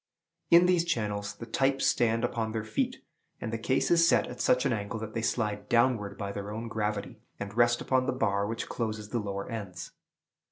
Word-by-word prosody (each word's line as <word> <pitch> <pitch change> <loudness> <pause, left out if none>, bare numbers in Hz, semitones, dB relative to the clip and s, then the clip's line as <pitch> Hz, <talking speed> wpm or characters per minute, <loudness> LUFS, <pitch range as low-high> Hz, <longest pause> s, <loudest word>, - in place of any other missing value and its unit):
In 170 +1 +7
these 180 -2 +3
channels, 105 -10 -2
the 115 - -8
types 135 +4 +1
stand 115 -1 +2
upon 110 -2 -1
their 110 -1 -2
feet, 110 0 -2 0.4
and 115 -1 -4
the 115 - -2
case 130 +7 +1
is 165 -1 +6
set - - +4
at 125 - -7
such 125 +1 +3
an 135 - +2
angle 105 0 -3
that 110 0 -6
they 115 - -2
slide 105 -3 -1
downward 115 -4 +2
by 100 -1 -4
their 100 0 -5
own 115 +2 -5
gravity, 105 -2 -3 0.2
and 100 0 -6
rest 120 0 +3
upon 130 0 +1
the - - +2
bar 100 -6 0
which 115 +1 -4
closes 110 -2 -3
the 120 - -1
lower 100 -2 -4
ends. 100 -6 -6
115 Hz, 205 wpm, -29 LUFS, 105-125 Hz, 0.4 s, In